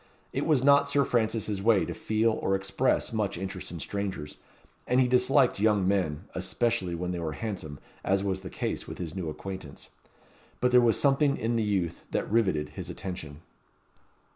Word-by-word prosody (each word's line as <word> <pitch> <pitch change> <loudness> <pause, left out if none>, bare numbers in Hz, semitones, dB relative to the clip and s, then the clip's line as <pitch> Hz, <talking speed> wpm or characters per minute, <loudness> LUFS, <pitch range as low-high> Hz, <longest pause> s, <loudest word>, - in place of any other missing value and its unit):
It - - -1
was 145 -5 +3
not 140 0 +5
Sir 140 -1 +3
Francis's 110 -4 0
way 100 -5 +4
to - - -4
feel 110 +1 +1
or 95 -3 0
express 95 +6 0
much 105 -4 -1
interest 95 0 -5
in 85 - -7
strangers, 95 -4 -4 0.5
and 125 +1 +3
he 130 - +4
disliked 125 -1 +3
young 105 -3 +3
men, 90 -5 0
especially 95 0 -1
when 90 +1 -3
they 90 - -3
were 80 -2 -3
handsome, 90 -8 -5 0.3
as 95 0 +1
was 95 -1 -1
the - - -7
case - - -3
with - - -7
his 85 -3 -5
new 90 -4 -3
acquaintance; 95 +4 -8 0.7
but 125 - +2
there 125 0 +7
was 115 -2 +3
something 140 0 +3
in 115 +1 -1
the 115 - +2
youth 100 -6 -1
that - - -2
riveted 95 -10 +2
his - - -7
attention. 85 -5 -7
100 Hz, 180 wpm, -28 LUFS, 90-115 Hz, 0.7 s, there